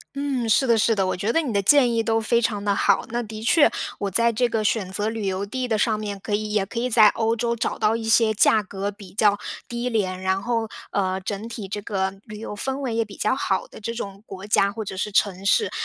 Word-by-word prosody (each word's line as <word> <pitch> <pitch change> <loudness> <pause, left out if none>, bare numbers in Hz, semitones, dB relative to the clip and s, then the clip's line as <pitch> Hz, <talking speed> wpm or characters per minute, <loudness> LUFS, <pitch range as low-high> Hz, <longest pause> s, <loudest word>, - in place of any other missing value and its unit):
嗯， 275 -5 -2
是 265 +5 +3
的， 230 -2 +4
是 225 +1 +3
的， 195 -3 +1
我 185 - 0
觉 200 +5 -1
得 330 - +3
你 270 -7 -3
的 200 - +2
建 250 +4 +5
议 225 - +2
都 225 0 +1
非 235 +1 +2
常 210 -3 -1
地 200 -1 +2
好。 - - +2
那 240 +1 -1
的 220 0 -8
确， 290 +6 +5 0.3
我 200 -1 -2
在 235 +4 +3
这 245 +2 +1
个 225 -2 -1
选 205 -3 0
择 205 +3 -1
旅 225 -3 -4
游 190 +1 -1
地 250 +5 -4
的 220 - +1
上 215 0 +1
面， 205 -2 -4
可 205 +2 -4
以 215 0 -2
也 210 -2 +1
可 230 +4 -5
以 250 - 0
在 220 -3 +6
欧 225 0 0
洲 235 +1 0
找 235 - -2
到 215 +1 +2
一 230 0 -3
些 225 0 +4
价 215 0 +4
格 200 +1 -4
比 200 -2 -13
较 205 0 +3 0.3
低 240 +1 -3
廉， 190 -5 -1
然 190 +1 0
后， 230 -1 -1 0.3
呃， 190 -1 0
整 205 +3 -5
体 220 -4 -7
这 205 +1 -4
个 190 -2 -1
旅 210 -3 -9
游 210 - -6
氛 265 +5 -3
围 260 -5 -3
也 230 0 +1
比 205 -2 -13
较 215 - +1
好 190 -7 -1
的 - - -12
这 230 +2 -4
种 200 -3 -7
国 195 0 -9
家 200 -1 +3
或 225 - -5
者 190 -2 -6
是 205 +2 -3
城 195 -1 +1
市。 435 - +3
215 Hz, 285 characters per minute, -23 LUFS, 200-230 Hz, 0.3 s, 在